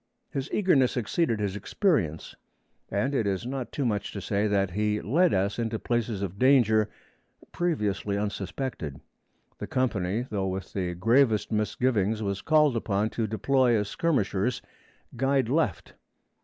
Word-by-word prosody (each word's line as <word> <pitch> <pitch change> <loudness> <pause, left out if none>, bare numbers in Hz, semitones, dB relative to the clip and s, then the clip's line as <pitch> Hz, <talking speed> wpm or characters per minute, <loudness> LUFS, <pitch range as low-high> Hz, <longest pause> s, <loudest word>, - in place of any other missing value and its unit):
His 135 +1 -4
eagerness 145 -12 +3
exceeded 120 0 0
his 100 -2 -2
experience, 105 - 0 0.6
and 130 +8 0
it 115 -6 +1
is 95 +2 -1
not 130 -1 -4
too 140 - -2
much 105 -4 -1
to 100 - -4
say 100 +1 0
that 100 -3 +1
he 105 +2 0
led 165 - +2
us 100 +4 0
into 115 -1 -1
places 115 -3 -2
of 100 +1 -5
danger 115 -5 +4 0.6
previously 105 - -1
unsuspected. 100 - -4 0.6
The - - -5
company, 115 -3 -1
though 100 -4 -2
with 95 0 -5
the 90 -3 -2
gravest 115 +3 +3
misgivings, 110 0 0
was 100 -1 -2
called 150 -4 +3
upon 110 -1 0
to 115 -2 -1
deploy 125 +3 +2
as 105 -1 -2
skirmishers, 125 - 0 0.5
guide 135 -1 +1
left. 140 - 0
110 Hz, 140 wpm, -27 LUFS, 100-130 Hz, 0.6 s, danger